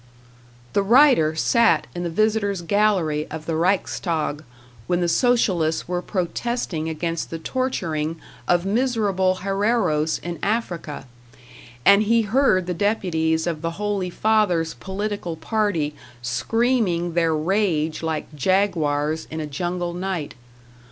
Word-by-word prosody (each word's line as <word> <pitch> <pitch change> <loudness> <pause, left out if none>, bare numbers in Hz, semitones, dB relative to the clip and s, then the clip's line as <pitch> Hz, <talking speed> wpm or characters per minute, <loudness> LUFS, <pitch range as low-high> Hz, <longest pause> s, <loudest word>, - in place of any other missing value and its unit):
The 200 - +3
writer 225 - +5
sat 230 +8 +3
in 175 - -4
the 175 - -2
visitors' 205 0 0
gallery 175 -6 +1
of 155 0 -7
the 165 - -2
Reichstag 165 -3 0 0.4
when 175 - +1
the 175 - +1
Socialists 180 -7 +2
were 175 0 -2
protesting 180 -3 -2
against 165 +1 -3
the 165 - -4
torturing 165 - -2 0.3
of 175 0 +2
miserable 200 -5 +1
Herreros 195 -6 +1
in 170 -2 -5
Africa, 180 - -2 0.8
and 200 +2 +7
he 230 +2 +3
heard 210 -4 +2
the 180 - -2
deputies 160 -5 0
of 165 -3 -2
the 165 0 -2
Holy 205 -3 -1
Father's 180 -5 +1
political 200 -3 -4
party 170 -4 -1 0.3
screaming 180 - 0
their 165 -2 +2
rage 160 -2 0
like 160 -2 -3
jaguars 160 -3 0
in 160 - -5
a 155 - -3
jungle 175 +4 -3
night. 180 -6 -3
175 Hz, 125 wpm, -23 LUFS, 160-205 Hz, 0.8 s, and